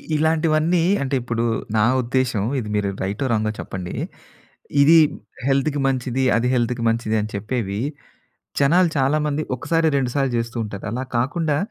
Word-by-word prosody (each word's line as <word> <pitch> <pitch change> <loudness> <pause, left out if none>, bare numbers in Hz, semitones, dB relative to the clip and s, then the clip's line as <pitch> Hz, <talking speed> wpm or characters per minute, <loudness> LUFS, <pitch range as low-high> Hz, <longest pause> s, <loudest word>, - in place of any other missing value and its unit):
ఇలాంటివన్నీ 160 +2 +2 0.2
అంటే 135 0 -1
ఇప్పుడు 115 -1 -2 0.3
నా 105 - +4 0.2
ఉద్దేశ్యం. 125 -4 0 0.2
ఇది 105 -3 -5
మీరు 105 -1 0
రైటో 100 +8 -2
రాంగో 110 0 0
చెప్పండి. 90 -1 -6 0.9
ఇది 160 +4 +7 0.5
హెల్త్‌కి 140 +1 +1
మంచిది, 130 0 -1
అది 120 - +1
హెల్త్‌కి 120 0 0
మంచిది 115 -1 -1
అని 105 - -4
చెప్పేవి 105 -1 -3 0.8
జనాలు 170 +6 +4
చాలామంది 150 +2 +1
ఒకసారి 165 +6 0
రెండు 130 -3 0
సార్లు 135 -3 +1
జెస్తూ 115 +1 -3
ఉంటారు. 100 -2 -7
అలా 125 +3 -3
కాకుండా 145 +4 0
130 Hz, 140 wpm, -22 LUFS, 115-150 Hz, 0.9 s, ఇది